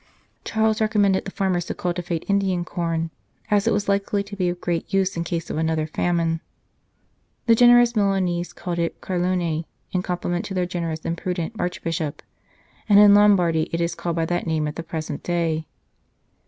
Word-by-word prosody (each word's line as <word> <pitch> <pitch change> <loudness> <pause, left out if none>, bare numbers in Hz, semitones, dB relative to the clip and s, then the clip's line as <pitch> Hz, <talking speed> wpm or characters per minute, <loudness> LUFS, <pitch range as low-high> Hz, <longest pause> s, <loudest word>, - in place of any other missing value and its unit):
Charles 220 0 +1
recommended 205 -3 +2
the - - -4
farmers 185 -3 -1
to - - -4
cultivate 175 -2 -3
Indian 195 -3 +1
corn, 165 -2 -2 0.4
as 205 +1 +3
it - - +4
was 205 0 0
likely 200 0 +1
to 200 0 -9
be 185 -3 0
of 175 0 -4
great 170 -2 -2
use 195 0 +1
in 170 - -1
case 170 0 -3
of - - -2
another 160 -1 0
famine. 165 0 0 1.0
The 230 - +6
grateful 240 -1 +6
Milanese 185 -3 0
called 175 -2 -4
it 170 0 -2
Carlone, 175 -3 -1 0.3
in 185 - 0
com 180 -1 -2
pliment 175 0 -2
to 195 - -5
their 180 -1 +1
generous 170 -3 -4
and 165 - -1
prudent 180 +2 -3
Archbishop, 165 -3 -3 0.7
and 200 - +7
in 205 0 +8
Lombardy 180 -6 +4
it 165 - -1
is 170 0 0
called 170 -1 -3
by 165 -1 0
that 175 +1 -2
name 155 -2 0
at 150 - -5
the 165 - -4
present 160 -3 -5
day. 165 -3 -1
175 Hz, 180 wpm, -23 LUFS, 165-195 Hz, 1.0 s, in